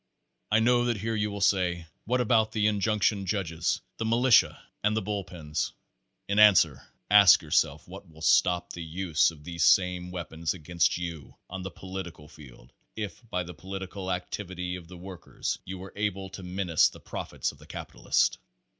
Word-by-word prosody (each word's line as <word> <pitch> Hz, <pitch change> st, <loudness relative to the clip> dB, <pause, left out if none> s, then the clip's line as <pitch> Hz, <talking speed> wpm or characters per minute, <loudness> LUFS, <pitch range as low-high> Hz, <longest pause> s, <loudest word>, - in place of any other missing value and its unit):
I 105 Hz, -, +4 dB
know 120 Hz, +1 st, +3 dB
that 120 Hz, -2 st, 0 dB
here 115 Hz, +3 st, -2 dB
you 105 Hz, -1 st, 0 dB
will 100 Hz, 0 st, -6 dB
say: 90 Hz, -4 st, +1 dB, 0.2 s
what 125 Hz, +3 st, +1 dB
about 110 Hz, -2 st, +2 dB
the 105 Hz, -2 st, +1 dB
in 105 Hz, -1 st, +2 dB
junction 105 Hz, -1 st, +1 dB
judges, 85 Hz, -5 st, -1 dB, 0.2 s
the -, -, -3 dB
militia 120 Hz, +2 st, +4 dB, 0.2 s
and 105 Hz, +1 st, +2 dB
the -, -, +1 dB
bull 100 Hz, 0 st, -2 dB
pens? 75 Hz, -5 st, -4 dB, 0.5 s
In 100 Hz, +1 st, +1 dB
an 105 Hz, -2 st, +9 dB
swer, 75 Hz, -7 st, +2 dB, 0.3 s
ask 100 Hz, -3 st, +8 dB
yourself -, -, +1 dB
what -, -, -11 dB
will 80 Hz, 0 st, -13 dB
stop 90 Hz, +2 st, +3 dB
the 85 Hz, -, -6 dB
use 80 Hz, 0 st, +1 dB
of 80 Hz, -3 st, -12 dB
these 85 Hz, 0 st, -3 dB
same 90 Hz, -1 st, +3 dB
weapons 85 Hz, -2 st, -4 dB
against 85 Hz, 0 st, 0 dB
you 85 Hz, -6 st, -7 dB, 0.2 s
on 95 Hz, 0 st, -5 dB
the 95 Hz, -, -5 dB
political 90 Hz, -3 st, -8 dB
field 65 Hz, -6 st, -15 dB, 0.2 s
if 105 Hz, -2 st, -5 dB
by 90 Hz, -3 st, -1 dB
the 90 Hz, +1 st, -9 dB
po 80 Hz, +4 st, -17 dB
litical 95 Hz, 0 st, -5 dB
activity 90 Hz, 0 st, -4 dB
of 90 Hz, -2 st, -10 dB
the 90 Hz, +1 st, -11 dB
workers 90 Hz, -1 st, -5 dB
you 95 Hz, +1 st, -6 dB
were 95 Hz, +1 st, -10 dB
able 100 Hz, -2 st, -2 dB
to 95 Hz, -, -8 dB
menace 90 Hz, -2 st, +2 dB
the -, -, -14 dB
profits -, -, -4 dB
of -, -, -20 dB
the -, -, -16 dB
capitalist? -, -, 0 dB
95 Hz, 185 wpm, -28 LUFS, 85-105 Hz, 0.5 s, an